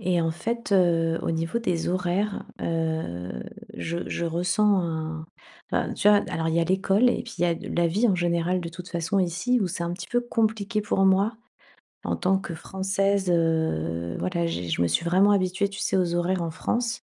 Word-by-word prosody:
Et 180 Hz, -1 st, +1 dB
en 165 Hz, -, +1 dB
fait, 225 Hz, +7 st, -3 dB
heu, 165 Hz, -3 st, +3 dB
au -, -, -1 dB
niveau 165 Hz, +6 st, -1 dB
des 180 Hz, -8 st, -1 dB
horaires, 185 Hz, +3 st, -1 dB, 0.2 s
heu, 160 Hz, -, -2 dB, 0.4 s
je 170 Hz, +1 st, -4 dB
je 170 Hz, -, -2 dB
ressens 180 Hz, +5 st, +2 dB
un 160 Hz, -2 st, -4 dB, 0.4 s
enfin, -, -, 0 dB
tu -, -, +3 dB
vois? 205 Hz, 0 st, +6 dB
Alors 165 Hz, -2 st, -1 dB
il 160 Hz, -, 0 dB
y 170 Hz, -, +3 dB
a -, -, +2 dB
l'école 195 Hz, +6 st, +3 dB
et -, -, -1 dB
puis 235 Hz, -, -10 dB
il -, -, 0 dB
y -, -, +5 dB
a 170 Hz, -1 st, +2 dB
d -, -, -8 dB
la 175 Hz, 0 st, +1 dB
vie 205 Hz, +9 st, +2 dB
en 195 Hz, -, +3 dB
général 175 Hz, +1 st, +1 dB
de 170 Hz, -, -5 dB
toute 175 Hz, +2 st, -9 dB
façon 170 Hz, +3 st, -1 dB
ici 185 Hz, +8 st, +1 dB
où 195 Hz, -, +1 dB
c'est 175 Hz, 0 st, -4 dB
un 170 Hz, -, -2 dB
petit 175 Hz, 0 st, -7 dB
peu 245 Hz, -, +1 dB
compliqué 220 Hz, -2 st, 0 dB
pour 200 Hz, -2 st, +1 dB
moi 195 Hz, +4 st, +3 dB, 0.7 s
en -, -, -1 dB
tant 190 Hz, +1 st, +2 dB
que 175 Hz, -3 st, -6 dB
française, 195 Hz, +2 st, 0 dB
heu, 85 Hz, -, 0 dB
voilà, 170 Hz, -2 st, -1 dB
j'ai 90 Hz, -, -3 dB
je 85 Hz, -, 0 dB
me 85 Hz, -, +3 dB
suis 85 Hz, -, 0 dB
vraiment 190 Hz, +4 st, +4 dB
habituée 190 Hz, 0 st, +1 dB
tu 200 Hz, -, -8 dB
sais? -, -, 0 dB
Aux 175 Hz, -2 st, +1 dB
horaires 175 Hz, +1 st, 0 dB
en 165 Hz, -, -2 dB
France 235 Hz, +8 st, -2 dB
175 Hz, 215 wpm, -25 LUFS, 165-200 Hz, 0.7 s, vois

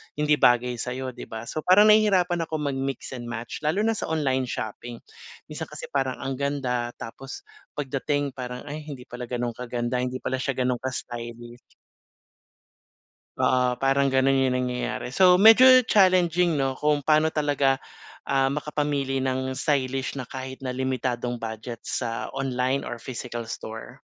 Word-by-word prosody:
hindi 150 Hz, -1 st, +2 dB
bagay 120 Hz, 0 st, +3 dB
sa'yo, 130 Hz, +1 st, -4 dB
'di -, -, -10 dB
ba? 110 Hz, 0 st, -7 dB
So, 155 Hz, -, -5 dB
parang 205 Hz, +4 st, +7 dB
nahihirapan 185 Hz, -6 st, +3 dB
ako 160 Hz, -, -4 dB, 0.2 s
mag-mix 135 Hz, 0 st, -4 dB
and 120 Hz, -2 st, -6 dB
match 120 Hz, 0 st, -6 dB
lalo 160 Hz, +8 st, 0 dB
na 225 Hz, -, +2 dB
sa -, -, -4 dB
online 135 Hz, -5 st, 0 dB
shopping. 115 Hz, +1 st, -6 dB, 0.5 s
Minsan -, -, -5 dB
kasi -, -, -8 dB
parang 135 Hz, -2 st, 0 dB
ang 135 Hz, 0 st, -2 dB
ganda 125 Hz, -4 st, -2 dB
tapos 135 Hz, +4 st, -9 dB, 0.3 s
pagdating 145 Hz, 0 st, -1 dB
parang 125 Hz, -1 st, -7 dB
ay 150 Hz, +2 st, -5 dB
hindi 135 Hz, -4 st, -7 dB
pala 125 Hz, 0 st, -7 dB
gano'n 120 Hz, -1 st, -2 dB
kaganda 120 Hz, 0 st, -2 dB
hindi 125 Hz, 0 st, -2 dB
pala 130 Hz, 0 st, -1 dB
siya 135 Hz, -1 st, -2 dB
gano'n 125 Hz, -1 st, 0 dB
ka-stylish. 120 Hz, -1 st, -6 dB, 1.8 s
Oo, 125 Hz, -1 st, +2 dB
parang 135 Hz, 0 st, +2 dB
gano'n 135 Hz, 0 st, +3 dB
'yung -, -, 0 dB
nangyayari 125 Hz, -1 st, -3 dB
so 180 Hz, +7 st, +5 dB
medyo 225 Hz, +4 st, +8 dB, 0.2 s
challenging 180 Hz, -5 st, +4 dB
'no 135 Hz, -1 st, 0 dB
kung 150 Hz, +1 st, +1 dB
paano 155 Hz, +2 st, +3 dB
talaga, 145 Hz, -3 st, +1 dB, 0.5 s
ah, 135 Hz, 0 st, +2 dB
makapamili 145 Hz, -2 st, -1 dB
ng 130 Hz, 0 st, -1 dB
stylish 135 Hz, -1 st, -1 dB
na 125 Hz, -, -6 dB
kahit 130 Hz, 0 st, -7 dB
na 130 Hz, -1 st, -4 dB
limitadong 125 Hz, -2 st, -2 dB
budget 115 Hz, +1 st, -6 dB
sa 115 Hz, -2 st, -2 dB
online 130 Hz, 0 st, -1 dB
or 120 Hz, -, -6 dB
physical 120 Hz, -2 st, -6 dB
store. 110 Hz, +4 st, -8 dB
130 Hz, 150 wpm, -25 LUFS, 125-145 Hz, 1.8 s, medyo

